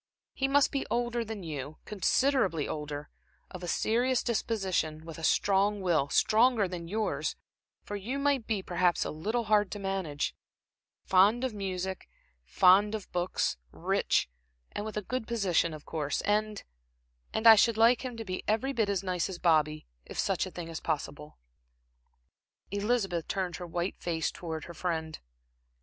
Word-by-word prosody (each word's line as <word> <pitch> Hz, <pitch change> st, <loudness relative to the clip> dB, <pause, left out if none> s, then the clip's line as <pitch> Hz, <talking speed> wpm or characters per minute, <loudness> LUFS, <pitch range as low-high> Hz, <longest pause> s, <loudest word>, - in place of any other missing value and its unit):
He 270 Hz, -, 0 dB
must 280 Hz, +1 st, +4 dB
be 275 Hz, -, -1 dB
older 240 Hz, 0 st, 0 dB
than 220 Hz, -3 st, -6 dB
you, 150 Hz, -2 st, -6 dB
considerably 210 Hz, -, +1 dB
older; 150 Hz, -1 st, -5 dB, 0.4 s
of 180 Hz, -, -8 dB
a 175 Hz, -, -5 dB
serious 245 Hz, +7 st, +1 dB
disposition, 190 Hz, -9 st, -1 dB
with 165 Hz, -1 st, -8 dB
a -, -, -9 dB
strong 200 Hz, +4 st, +2 dB
will, 165 Hz, -7 st, +1 dB
stronger 225 Hz, -, +4 dB
than 175 Hz, -2 st, -6 dB
yours, 215 Hz, +4 st, -1 dB, 0.5 s
for 205 Hz, -, -6 dB
you 220 Hz, +7 st, -3 dB
might 280 Hz, -4 st, +1 dB
be 210 Hz, -4 st, -1 dB
perhaps 175 Hz, -1 st, +1 dB
a -, -, -3 dB
little 215 Hz, +10 st, -2 dB
hard 210 Hz, -2 st, +3 dB
to -, -, -5 dB
manage; 190 Hz, -7 st, -2 dB, 0.7 s
fond 200 Hz, +6 st, +4 dB
of 260 Hz, -3 st, -1 dB
music 190 Hz, -2 st, -4 dB, 0.3 s
and -, -, -36 dB
fond 200 Hz, +4 st, +5 dB
of 210 Hz, -, -7 dB
books; 175 Hz, -, 0 dB
rich, -, -, +1 dB, 0.4 s
and 205 Hz, -, -4 dB
with 215 Hz, -1 st, -5 dB
a 210 Hz, -, -2 dB
good 255 Hz, +3 st, -3 dB
position 195 Hz, -8 st, +1 dB
of 155 Hz, -1 st, -9 dB
course; 150 Hz, -3 st, -2 dB
and 210 Hz, 0 st, 0 dB, 0.7 s
and 220 Hz, -, -2 dB
I 225 Hz, -, +12 dB
should 220 Hz, +1 st, +4 dB
like 235 Hz, +3 st, +5 dB
him 250 Hz, -3 st, -5 dB
to 225 Hz, -, -6 dB
be 185 Hz, -1 st, -4 dB
every 240 Hz, +6 st, +1 dB
bit 220 Hz, -5 st, +1 dB
as 195 Hz, -2 st, 0 dB
nice 180 Hz, -2 st, -1 dB
as 185 Hz, -, -5 dB
Bobby, 155 Hz, -3 st, +2 dB, 0.2 s
if -, -, -10 dB
such -, -, 0 dB
a -, -, -9 dB
thing 175 Hz, -2 st, -7 dB
is 165 Hz, -1 st, -5 dB
possible." 150 Hz, -1 st, -4 dB, 1.3 s
Elizabeth 200 Hz, -5 st, 0 dB
turned 185 Hz, -3 st, -2 dB
her 175 Hz, -, -7 dB
white 175 Hz, +2 st, -3 dB
face 165 Hz, -2 st, -1 dB
towards 160 Hz, -3 st, -6 dB
her 170 Hz, -, -9 dB
friend. 160 Hz, -2 st, -3 dB
195 Hz, 165 wpm, -30 LUFS, 170-220 Hz, 1.3 s, I